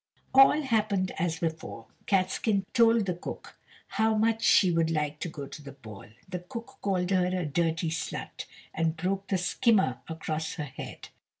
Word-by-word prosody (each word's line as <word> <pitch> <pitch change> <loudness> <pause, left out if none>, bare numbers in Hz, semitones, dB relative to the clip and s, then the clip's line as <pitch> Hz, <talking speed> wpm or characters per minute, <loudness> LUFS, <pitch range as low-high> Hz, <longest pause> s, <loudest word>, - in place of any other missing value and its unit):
All 270 +3 +7
happened 210 -7 +1
as 165 -1 0
before. 160 -8 -4 0.2
Catskin 195 +1 +1
told 230 -3 +5
the 180 - 0
cook 175 - -8 0.3
how 220 0 +1
much 225 +1 +2
she 180 -1 +5
would 165 -1 +2
like 150 -2 -1
to 175 - -3
go 145 -3 -7
to 145 - -10
the 140 -1 -10
ball, 110 -7 -11 0.2
the 180 -1 -4
cook 230 +8 -9
called 185 -2 0
her 185 -2 +3
"a 180 -1 -1
dirty 165 +2 0
slut," 160 -1 -5 0.3
and 165 0 0
broke 190 +3 -2
the 195 - +1
skimmer 190 - +2
across 160 0 -3
her 155 - -3
head. 135 -2 -8
180 Hz, 170 wpm, -28 LUFS, 160-205 Hz, 0.3 s, All